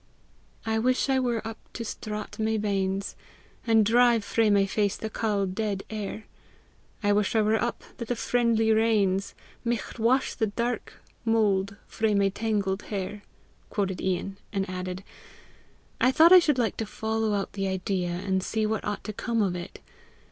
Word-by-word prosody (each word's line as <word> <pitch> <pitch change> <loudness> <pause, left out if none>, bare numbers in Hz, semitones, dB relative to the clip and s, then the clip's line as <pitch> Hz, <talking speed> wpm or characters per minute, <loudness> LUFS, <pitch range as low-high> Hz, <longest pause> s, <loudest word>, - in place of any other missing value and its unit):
"I 220 0 +1
wish 255 +4 +1
I 265 -1 +3
were 240 -3 -1
up 225 - -7
to 230 - -5
straught 210 0 -6
my 220 0 +1
banes, 195 -2 -1 0.5
And 225 -2 +5
drive 235 0 +4
frae 225 +1 +2
my 200 -1 +4
face 205 +1 0
the 220 - -5
cauld, 200 -4 -1
dead 205 -2 -2
air; 215 0 -5 0.8
I 205 0 +3
wish 205 +1 +1
I 220 - +5
were 215 +1 +2
up, 240 - -2
that 235 - -5
the 245 - -1
friendly 230 -2 +2
rains 210 -4 +2 0.3
Micht 235 0 -3
wash 245 +4 +2
the 220 - 0
dark 235 +4 -3 0.3
mould 200 -4 +2
frae 220 -2 0
my 200 0 +3
tangled 205 -2 -1
hair!" 205 0 -4 0.5
quoted 195 -3 -2
Ian, 190 +1 -2
and 195 -2 -1
added, 185 0 -5 1.0
"I 255 - +4
thought 325 +5 +6
I 370 - +11
should 300 -6 +2
like 235 -3 0
to 225 - -3
follow 220 0 -1
out 200 - -3
the 195 -1 -2
idea, 190 -1 -1
and 190 +2 -1
see 220 +3 -1
what 215 0 -1
ought 205 0 -3
to 215 - -5
come 230 +1 0
of 185 -3 0
it. 175 +1 -8
215 Hz, 170 wpm, -27 LUFS, 195-225 Hz, 1.0 s, I